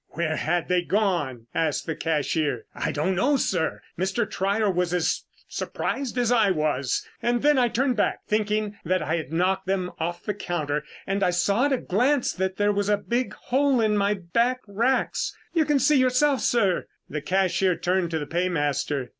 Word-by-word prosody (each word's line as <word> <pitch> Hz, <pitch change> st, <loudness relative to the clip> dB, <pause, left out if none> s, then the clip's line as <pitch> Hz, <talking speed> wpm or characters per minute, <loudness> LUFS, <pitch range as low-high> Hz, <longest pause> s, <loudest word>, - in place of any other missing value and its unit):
"Where 155 Hz, -1 st, -1 dB
had 175 Hz, +1 st, 0 dB
they 180 Hz, -1 st, +2 dB
gone?" 175 Hz, -, 0 dB
asked 160 Hz, -3 st, 0 dB
the 160 Hz, -, -3 dB
cashier. 155 Hz, -1 st, -1 dB
"I -, -, -2 dB
don't 155 Hz, +6 st, 0 dB
know, 265 Hz, +10 st, +2 dB
sir. 180 Hz, -9 st, -1 dB, 0.2 s
Mr. 195 Hz, +5 st, 0 dB
Trier 200 Hz, +3 st, 0 dB
was 180 Hz, -1 st, 0 dB
as 175 Hz, -, 0 dB, 0.2 s
surprised 265 Hz, -3 st, -3 dB
as 240 Hz, -1 st, +2 dB
I 225 Hz, -4 st, +4 dB
was, 150 Hz, -6 st, 0 dB
and 240 Hz, 0 st, 0 dB
then 295 Hz, -2 st, +5 dB
I 245 Hz, -, +4 dB
turned 250 Hz, +1 st, 0 dB
back, 205 Hz, -, +1 dB
thinking 210 Hz, -1 st, -1 dB
that 185 Hz, 0 st, 0 dB
I 160 Hz, +3 st, 0 dB
had 160 Hz, -3 st, -5 dB
knocked 185 Hz, +3 st, 0 dB
them 185 Hz, -2 st, -1 dB
off 175 Hz, +1 st, -3 dB
the 210 Hz, -, -2 dB
counter, 150 Hz, -7 st, -2 dB, 0.2 s
and 195 Hz, +1 st, -1 dB
I 185 Hz, -, +3 dB
saw 200 Hz, +7 st, +2 dB
at 285 Hz, -, +2 dB
a -, -, +2 dB
glance 250 Hz, +7 st, +1 dB
that 190 Hz, 0 st, -2 dB
there 205 Hz, 0 st, +3 dB
was 205 Hz, 0 st, -1 dB
a 205 Hz, -, +3 dB
big 240 Hz, +4 st, -2 dB
hole 270 Hz, 0 st, +1 dB
in 215 Hz, -2 st, +2 dB
my 205 Hz, 0 st, +2 dB
back 235 Hz, +8 st, 0 dB
racks. 230 Hz, +6 st, 0 dB, 0.2 s
You 325 Hz, -3 st, +3 dB
can 295 Hz, -1 st, +2 dB
see 275 Hz, +2 st, +4 dB
yourself, 255 Hz, +2 st, +3 dB
sir." 200 Hz, -7 st, +1 dB, 0.2 s
The 150 Hz, -, -4 dB
cashier 185 Hz, +2 st, +1 dB
turned 175 Hz, +1 st, 0 dB
to 160 Hz, -, -1 dB
the 150 Hz, -, -3 dB
paymaster. 145 Hz, -5 st, -1 dB
190 Hz, 190 wpm, -25 LUFS, 170-235 Hz, 0.2 s, then